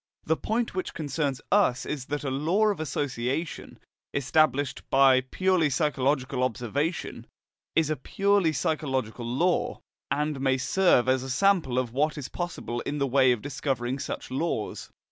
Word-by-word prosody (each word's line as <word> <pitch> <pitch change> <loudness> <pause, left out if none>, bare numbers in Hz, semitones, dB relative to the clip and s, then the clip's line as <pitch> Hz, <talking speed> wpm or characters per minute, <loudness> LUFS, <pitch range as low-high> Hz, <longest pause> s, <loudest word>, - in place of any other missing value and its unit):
The 160 - +1
point 225 +7 -2
which 185 - -4
concerns 145 -3 -2
us 180 -11 +3
is 140 -4 -4
that 145 +1 -3
a 135 - -2
law 170 +11 +2
of 200 -5 -2
association, 145 0 -3 0.4
established 140 -1 +2
by 135 -1 +5
purely 180 +4 +1
psychological 135 -3 0
observation, 130 - -2 0.5
is 160 -1 +2
a - - +1
purely 195 +5 +1
psychological 130 -8 -2
law, 170 +9 0 0.3
and 150 0 -1
may 135 -1 +2
serve 135 -2 +3
as 130 0 +3
a 135 - -6
sample 165 -4 +2
of 125 -3 -1
what 150 +4 +1
is 140 -3 -5
possible 175 -9 -4
in 145 - -3
the 140 - +1
way 130 -1 +4
of 120 -4 -1
discovering 135 -2 -2
such 140 - -5
laws. 130 -5 -2
140 Hz, 150 wpm, -27 LUFS, 130-160 Hz, 0.5 s, by